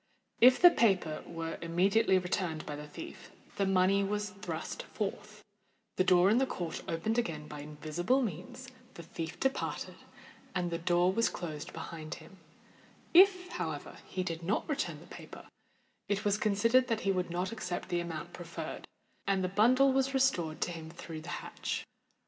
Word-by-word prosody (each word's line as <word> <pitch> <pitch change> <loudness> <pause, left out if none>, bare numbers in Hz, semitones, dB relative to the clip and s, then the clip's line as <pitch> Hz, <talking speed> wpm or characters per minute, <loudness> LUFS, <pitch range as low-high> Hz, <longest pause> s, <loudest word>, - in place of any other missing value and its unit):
If 250 +2 +7
the 355 0 +9
paper 190 - +2
were 165 -1 -5
immediately 190 +5 +3
returned 180 -3 -2
by 150 - -5
the 150 +1 -8
thief, 150 - -9 0.3
the 195 - +2
money 195 +1 +4
was 205 0 -2
thrust 185 -5 -5
forth; 210 0 -5 0.5
the 185 - +3
door 180 +1 +5
in 230 - +4
the 265 - +2
court 170 -8 -4
opened 215 +8 0
again 155 -9 -3
by 150 - -8
invisible 155 - 0
means, 210 +6 -5 0.3
the 170 - -8
thief 165 0 -6
departed, 265 0 -1 0.6
and 175 -2 0
the 170 - -2
door 175 +2 +3
was 230 +3 +2
closed 155 -4 -6
behind 155 -2 -6
him: 165 +4 -14 0.8
if, 365 0 +6
however, - - -4
he 185 - -2
did 165 -2 -4
not 190 +6 -1
return 305 -1 -2
the - - -13
paper, - - -11 0.6
it 205 +1 0
was 205 -1 +3
considered 230 +5 +3
that 225 -2 0
he 195 - +2
would 180 -2 -1
not 180 +3 -2
accept 185 -6 -4
the 175 - +1
amount 170 0 -5
proffered, 165 -2 -7 0.4
and 195 -1 +2
the - - +1
bundle 255 +7 +5
was 270 0 +1
restored 175 -13 +1
to - - 0
him 160 -2 -7
through 160 -1 -8
the 165 - -9
hatch. - - -4
185 Hz, 170 wpm, -32 LUFS, 165-220 Hz, 0.8 s, the